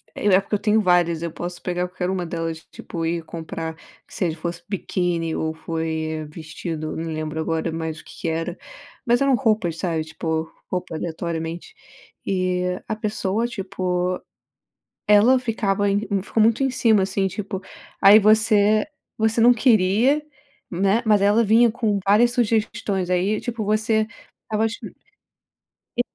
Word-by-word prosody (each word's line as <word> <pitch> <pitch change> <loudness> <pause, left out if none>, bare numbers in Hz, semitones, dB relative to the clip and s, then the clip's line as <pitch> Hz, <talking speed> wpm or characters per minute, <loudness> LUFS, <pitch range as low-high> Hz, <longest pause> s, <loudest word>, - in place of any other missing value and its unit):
E 205 - -2
é 190 -1 +6
porque 210 - -2
eu - - -1
tenho 215 0 +3
várias. 175 -3 +2
Eu 170 -1 -3
posso 175 +1 -6
pegar 180 0 -2
qualquer 180 0 -3
uma 185 -2 -2
delas, 165 -1 -4
tipo 165 -1 -5
ir 165 0 -1
comprar, 160 0 -6 0.3
que - - -16
seja 165 -3 -1
fosse 170 +1 -5
biquíni 175 -4 -1
ou 160 0 -2
foi 160 -1 -3
vestido. 155 0 -6
Não 165 0 -4
lembro 155 0 -4
agora 165 +1 -1
mais 160 -1 -4
o - - -14
que - - -13
que 165 - -1
era, 165 +2 -3 0.5
mas 240 +2 +3
eram 275 -2 +4
roupas 215 -9 +1
sabe, 165 -3 -1
tipo 160 0 -3 0.2
roupa 180 -2 -3
aleatoriamente 165 - -4 0.5
e 185 -1 0 0.3
a 220 - -2
pessoa 215 +1 -1
tipo, 185 -4 -2 0.9
ela 215 +5 +6
ficava 205 -4 0
em 200 +1 +1 0.2
ficou 220 - 0
muito 230 +4 +3
em 265 - +2
cima, 220 -6 +3
assim, 195 0 0
tipo 195 0 -5 0.4
aí 205 +2 +9
você 215 0 +4 0.3
você 220 +1 +2
não 245 +1 +7
queria, 235 +5 +3 0.5
né. 195 +6 +1
Mas 210 -2 +4
ela 210 +3 +4
vinha 225 +3 +5
com 220 -4 0
várias 220 +5 +5
sugestões, 220 -5 0
aí 190 +4 +1
tipo, 230 -4 -4
você 220 +1 +1 0.4
estava 220 0 0
exp 225 +1 -5 1.0
E - - +4
190 Hz, 155 wpm, -22 LUFS, 165-220 Hz, 1.0 s, aí